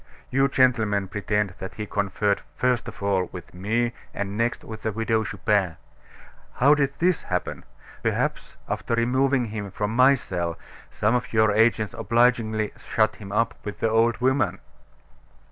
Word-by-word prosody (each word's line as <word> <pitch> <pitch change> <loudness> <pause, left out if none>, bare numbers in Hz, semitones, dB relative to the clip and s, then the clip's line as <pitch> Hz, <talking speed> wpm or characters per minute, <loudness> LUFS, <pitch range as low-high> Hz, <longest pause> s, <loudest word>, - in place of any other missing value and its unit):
You 135 +2 +3
gentlemen 110 -7 +2
pretend 105 -1 -1
that 95 - -7
he 105 - -4
conferred 100 0 0
first 125 -1 +1
of 105 -3 -8
all 95 -3 +1
with 90 -1 -10
me, 115 +6 0 0.2
and 100 0 -3
next 115 +2 -1
with 110 -1 -8
the 110 - -1
Widow 110 +1 0
Chupin. 95 -6 0 0.8
How 140 +4 +5
did 140 -2 0
that 180 -1 +3
happen? 90 0 -3 0.4
Perhaps - - -2
after 115 - -2
removing 130 +2 +2
him 105 -2 -5
from 105 +3 -3
my 130 +3 +6
cell, 85 -8 -3 0.3
some 105 +2 0
of 125 +3 -1
your 110 -1 +4
agents 110 0 +2
obligingly 115 -2 +1
shut 110 -1 0
him 100 -2 -9
up 115 +3 +1
with 105 - -6
the 115 - +1
old 115 +1 +3
woman." 125 -7 +1
110 Hz, 155 wpm, -25 LUFS, 100-120 Hz, 0.8 s, my